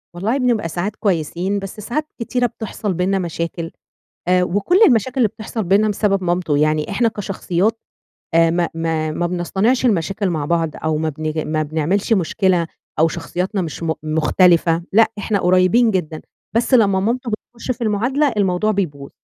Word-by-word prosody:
والله 215 +9 0
بنبقى 240 -9 0
ساعات 185 +6 -3
كويسين، 185 0 -1
بس 195 +1 -8
ساعات 245 +9 -3
كتيرة 245 +1 0
بتحصل 215 -3 -4
بينّنا 185 +3 0
مشاكل 170 -1 -4 0.6
آآ، 180 0 +3
وكُلّ 205 - +1
المشاكل 250 +2 +1
اللي 240 - +4
بتحصل 220 +1 -5
بينّنا 200 +4 +3
بسبب 195 -2 0
مامته 175 -4 0
يعني، 155 0 +1
إحنا 230 +4 +2
كشخصيات 205 0 -1 0.5
آآ، 165 0 +5
ما 170 0 0
ما 160 -1 -1
ما 175 +2 -1
بنصطنعش 190 +9 0
المشاكل 195 -1 0
مع 155 -4 -2
بعض 165 +1 +1
أو 160 -1 0
ما 160 +1 -1
بنيجي 155 +1 -3
ما 155 0 -1
بنعملش 160 +8 0
مشكلة 180 -2 +1 0.3
أو 160 - +5
شخصياتنا 185 +4 -3
مش 165 0 -5
م 160 -1 0
مختلفة، 165 +2 +3
لأ، 225 +1 +5
إحنا 205 0 -1
قريبين 185 +6 +4
جدًا، 160 -5 -2 0.3
بس 235 +3 +1
لمّا 200 -6 +4
مامته 235 +3 -1
بتخُشّ 235 +3 -5
في 240 - -6
المعادلة 245 +7 +1
الموضوع 195 +2 +1
بيبوظ. 145 -9 -3
185 Hz, 160 wpm, -19 LUFS, 165-215 Hz, 0.6 s, آآ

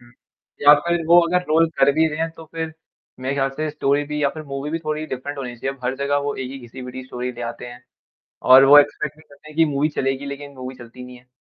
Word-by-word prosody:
हुँ। 120 0 -20 0.5
या 145 +1 +9
फ़िर 170 +1 -1
वो 170 +1 +7
अगर 180 +1 +1
रोल 165 +1 +4
कर - - +5
भी 160 +2 +3
रहे 155 0 -6
हैं 165 0 -1
तो 165 - -11
फ़िर 160 -1 -4 0.5
मेरे 130 +2 -2
ख़्याल 135 -1 0
से 155 0 -2
स्टोरी 145 -1 0
भी 150 0 -4
या 140 - +4
फ़िर 155 - -8
मूवी 140 +1 -5
भी 165 - -2
थोड़ी 155 0 -2
डिफ़रेंट 140 +1 -6
होनी 125 -3 -6
चाहिए। 135 +4 -4
अब 125 - -16
हर 130 +2 0
जगह 140 +1 0
वो 145 - -2
एक 130 -1 -5
ही 135 - -7
घिसी-पीटी 125 +1 -9
स्टोरी 125 0 -5
ले 120 - -11
आते 120 - -10
हैं 120 0 -12 0.7
और 130 +1 +10
वो 145 +2 +9
एक्सपेक्ट 150 0 +1
भी 155 - -18
करते 145 -1 -18
हैं 155 - -14
कि 165 - +5
मूवी 145 +2 +2
चलेगी 135 +1 -1
लेक़िन 140 0 -7
मूवी 130 0 -7
चलती 125 0 -12
नहीं 125 0 -11
है। 125 - -24
140 Hz, 265 wpm, -21 LUFS, 130-155 Hz, 0.7 s, और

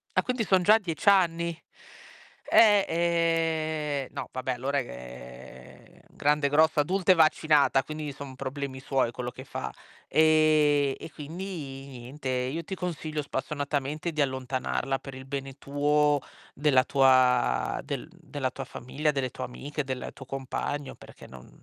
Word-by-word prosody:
Ah, - - +5
quindi 250 -3 -1
son 190 -2 +3
già 215 +5 +6
10 190 -1 0
anni. 170 -3 +2 0.9
Eh, 205 -3 +6
ehm, 160 -4 0
no, - - -5
vabbè 130 0 -3
allora, 135 +3 -2
ehm, 60 - -11
grande, 145 -1 +1
grossa, 155 +1 +4
adulta 185 +4 +2
e - - -3
vaccinata 155 -4 +4
quindi 155 0 -5
son 135 -1 -9
problemi 135 0 -5
suoi 130 -3 0
quello 125 0 -5
che 130 - -10
fa. 65 - -5 0.3
Ehm, 155 -3 +4
e 160 - -9
quindi 150 -4 -7
niente, 130 +3 -6
io 130 +6 -1
ti 190 +4 -5
consiglio 155 -4 -4
spassionatamente 145 +3 -3
di 155 -1 -1
allontanarla 130 0 -1
per 135 -1 -9
il 130 - -9
bene 135 0 -5
tuo, 145 +1 +2 0.3
della 135 -3 +3
tua 130 -3 +3
del - - -5
della - - -4
tua - - -6
famiglia, 145 +5 -3
delle 135 -3 -2
tue - - -5
amiche, 145 +4 -5
del 130 -1 -5
tuo 135 - -11
compagno, 135 +1 -4
perché - - -14
non 65 -1 -13
145 Hz, 145 wpm, -27 LUFS, 130-160 Hz, 0.9 s, già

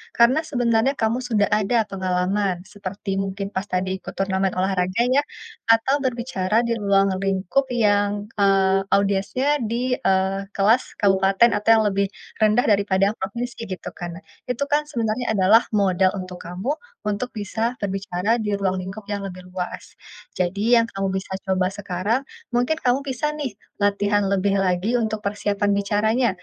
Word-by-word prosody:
karena 235 +5 +5
sebenarnya 240 -1 +2
kamu 225 +1 0
sudah 225 -5 +1
ada 215 +2 +2
pengalaman 185 0 -1 0.2
seperti 195 +1 -3
mungkin 195 0 -3
pas 190 -1 -3
tadi 185 -1 -2
ikut - - -9
turnamen 195 -1 0
olahraga 185 +2 0
ya, 275 +3 +3 0.5
atau 225 +5 +2
berbicara 235 -4 0
di 235 -1 -1
ruang 200 -2 +3
lingkup 195 +7 0
yang, 205 -2 +1
eee, 195 -1 +3
audiendnya 200 +7 +1 0.2
di, 245 +3 -1
eee, 190 0 +1
kelas 215 +6 +2
kabupaten 195 +3 +4
atau 210 +2 -2
yang 220 -1 +4
lebih 200 0 +1 0.3
rendah 215 +2 +4
daripada 200 -1 +3
provinsi 235 +6 -4
gitu 185 -5 -6
kan. 175 0 -8 0.2
Itu 250 +2 -2
kan 295 +1 +2
sebenarnya 235 -4 -1
adalah 210 +3 +5
modal 190 -2 +3
untuk 185 -2 -6
kamu, 190 - -3 0.3
untuk 210 +5 -3
bisa 220 +3 -2
berbicara 195 +2 -1
di 210 -3 -2
ruang 195 -2 0
lingkup 200 +2 -8
yang 200 -1 -3
lebih 185 -1 -9
luas. 180 -1 -6 0.4
Jadi 200 +7 +2
yang 230 - +4
kamu 195 -3 -3
bisa 190 0 -6
coba 190 -1 0
sekarang, 200 +4 -1 0.3
mungkin 245 +6 +1
kamu 250 +2 +3
bisa 280 +2 -2
nih, 275 -9 -5 0.2
latihan 205 0 +2
lebih 200 0 +1
lagi 185 +4 0
untuk 220 -1 -1
persiapan 205 0 0
bicaranya. 215 +4 +1
205 Hz, 150 wpm, -22 LUFS, 190-230 Hz, 0.5 s, karena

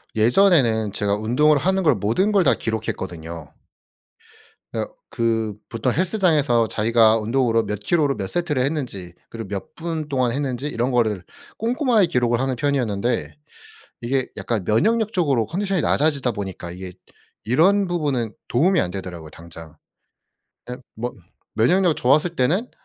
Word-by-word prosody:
예전에는 115 - +4
제가 100 -1 0
운동을 125 +8 +2
하는 190 +6 +1
걸 150 -4 +4
모든 115 - +1
걸 195 -4 +3
다 - - +6
기록했거든요. 85 -7 -5 1.2
어 - - -2 0.2
그 115 -2 -1
보통 115 +2 -1
헬스장에서 155 - +2
자기가 110 +1 +3
운동으로 115 0 +1
몇 105 -1 -4
킬로로 145 +4 +1
몇 95 - -3
세트를 155 -7 -1
했는지 125 - -3 0.2
그리고 115 -3 -7
몇 100 0 -6
분 160 -2 -4
동안 130 -4 +1
했는지 135 -1 -2
이런 125 -2 -1
거를 110 -7 0 0.3
꼼꼼하게 235 - +2
기록을 120 -6 +1
하는 130 -1 -1
편이었는데 120 - -1 0.7
이게 130 +2 0
약간 110 -6 -3
면역력적으로 180 - +1
컨디션이 190 - -1
낮아지다 140 -5 +1
보니까 95 -5 -6
이게 90 +1 -7 0.5
이런 185 - +3
부분은 140 -10 -1
도움이 170 +7 +2
안 90 - -2
되더라고요 90 -4 -7
당장. 80 0 -12 0.9
예 125 - -4 0.2
뭐 120 +2 -4 0.4
면역력 170 - +3
좋았을 155 +7 +2
때는 180 - +1
125 Hz, 330 characters per minute, -22 LUFS, 110-160 Hz, 1.2 s, 다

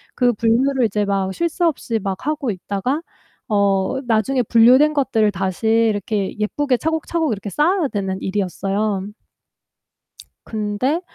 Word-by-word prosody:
그 245 -1 +3
분류를 245 +4 +2
이제 210 0 0
막 195 -1 -1
쉴 340 - -1
새 345 - -3
없이 240 -8 -1
막 195 +5 -4
하고 295 -5 -1
있다가 205 - -3 0.5
어 200 +4 +1
나중에 235 +4 +1
분류된 250 +7 +5
것들을 225 -7 +2
다시 190 +3 -3
이렇게 215 -3 +1
예쁘게 255 +4 0
차곡차곡 320 -1 -1
이렇게 205 0 -6
쌓아야 335 +1 +2
되는 190 -2 -3
일이었어요. 195 +1 -2 1.4
근데 220 - -1
225 Hz, 290 characters per minute, -20 LUFS, 200-270 Hz, 1.4 s, 분류된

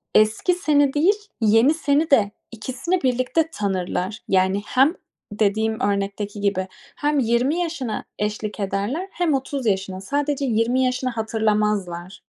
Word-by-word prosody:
eski 215 - +4
seni 290 -5 +2
değil, 330 +7 +4 0.3
yeni 225 +7 +5
seni 305 0 +1
de, 205 -6 +4 0.2
ikisini 260 - -2
birlikte 255 +6 +1
tanırlar. 190 +1 -2
Yani 190 +1 +2
hem 275 +7 +3 0.4
-dediğim 220 0 +1
örnekteki 200 +1 -4
gibi 195 -2 0 0.3
hem 295 -1 +1
20 250 +7 +1
yaşına 315 -10 -3 0.2
eşlik 210 0 -3
ederler 205 - -2
hem 340 -4 0
30 270 0 -2
yaşına; 190 -1 -1
sadece 285 +4 -1
20 240 +2 +2
yaşını 255 0 0
hatırlamazlar. 210 -5 -1
225 Hz, 125 wpm, -22 LUFS, 205-285 Hz, 0.4 s, yeni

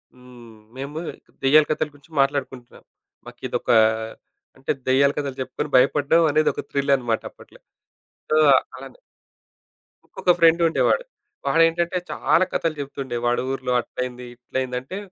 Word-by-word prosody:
హ్మ్. 120 -3 -15 0.2
మేము 145 +4 -5 0.4
దెయ్యాల 150 +3 +6
కథల 155 0 -1
గురించి 145 +3 -22
మాట్లాడుకుంటున్నాం. 135 -3 -3 0.4
మాకిదొక - - -6 0.9
అంటే 135 - -3 0.2
దెయ్యాల 140 +2 +4
కథలు 140 -2 -3
చెప్పుకొని 130 - -4
భయపడ్డం 145 +5 +4
అనేది 155 +1 +2
ఒక - - -5
థ్రిల్ 140 0 +1
అనమాట 120 -3 -2
అప్పట్లో. - - -18 0.7
సో - - +2 0.4
అలానే - - -12 1.1
ఇంకొక 180 - 0
ఫ్రెండ్ 165 +1 +5
ఉండేవాడు. 485 - +1 0.4
వాడేంటంటే 165 +2 +2
చాలా 185 +3 +2
కథలు 165 -2 -1
జెప్తుండే 135 -3 -5
వాడు 120 0 +1
ఊర్లో 130 -2 -3
"అట్లైంది, 125 0 -6
ఇట్లైంది" 125 +1 -4
అంటే 185 +9 -8
140 Hz, 125 wpm, -22 LUFS, 125-155 Hz, 1.1 s, దెయ్యాల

